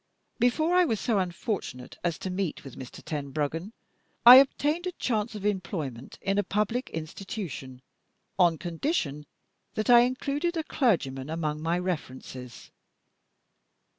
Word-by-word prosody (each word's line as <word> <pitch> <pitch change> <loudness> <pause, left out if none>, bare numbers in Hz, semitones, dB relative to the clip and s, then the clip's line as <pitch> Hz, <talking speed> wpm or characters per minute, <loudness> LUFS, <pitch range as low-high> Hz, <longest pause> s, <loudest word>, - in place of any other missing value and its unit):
Before 310 +8 +2
I 365 - +6
was 225 - 0
so 220 -4 +1
unfortunate 175 - -4
as 170 -2 0
to 185 - -5
meet 185 -3 -3
with 135 - -10
Mr. 130 -1 -10
Tenbruggen, 150 +5 -3 0.5
I 245 +2 +13
obtained 295 +5 +3
a 360 - -3
chance 225 -6 -1
of 205 -1 -6
employment 165 - -3
in 195 +1 +1
a - - +2
public 210 +6 -1
Institution, 160 - -6 0.6
on 170 -3 +5
condition 165 - -2 0.5
that 215 +3 +1
I 240 - +10
included 280 +7 0
a 320 - 0
clergyman 150 - 0
among 155 -2 -2
my 165 +2 0
references. 130 -8 -6
185 Hz, 135 wpm, -28 LUFS, 150-240 Hz, 0.6 s, I